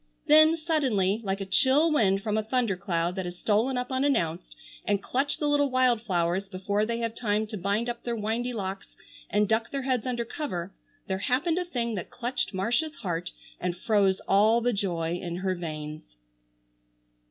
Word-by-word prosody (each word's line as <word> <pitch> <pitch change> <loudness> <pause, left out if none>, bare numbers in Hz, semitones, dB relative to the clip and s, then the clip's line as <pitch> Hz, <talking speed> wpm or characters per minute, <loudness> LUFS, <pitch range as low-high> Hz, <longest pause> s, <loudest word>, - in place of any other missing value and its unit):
Then, 310 +2 +6
suddenly, 250 - +1
like 195 0 -2
a - - -2
chill 265 - +4
wind 195 -7 +2
from 215 -1 -1
a 220 - +2
thunder 225 -2 0
cloud 175 -2 -1
that 190 - -3
has 175 0 -6
stolen 225 +7 +1
up 250 +1 -3
unannounced 260 - 0 0.3
and 205 -1 +1
clutched 270 +7 -1
the 295 - 0
little 290 -1 +3
wild 255 -3 +3
flowers 185 -2 0
before 200 +2 -1
they 230 0 -1
have 230 -1 -2
time 215 -2 0
to 215 - -7
bind 200 +4 -1
up 240 -1 -4
their 240 -1 -3
windy 225 +3 -2
locks 195 -4 -5 0.3
and 210 0 +2
duck 220 +1 +1
their 275 -1 -3
heads 255 -3 0
under 240 -2 -1
cover, 195 - -4 0.3
there 190 0 -2
happened 290 - +1
a 360 - -2
thing 240 -9 -2
that 185 -5 -5
clutched 250 +1 -2
Marcia's 240 +11 0
heart 175 -2 -3 0.3
and 180 0 -2
froze 195 -1 +2
all 215 +4 +4
the 245 +1 +1
joy 175 -4 -1
in 170 -1 -4
her 185 +1 -1
veins. 155 - -7
215 Hz, 185 wpm, -27 LUFS, 190-250 Hz, 0.3 s, Then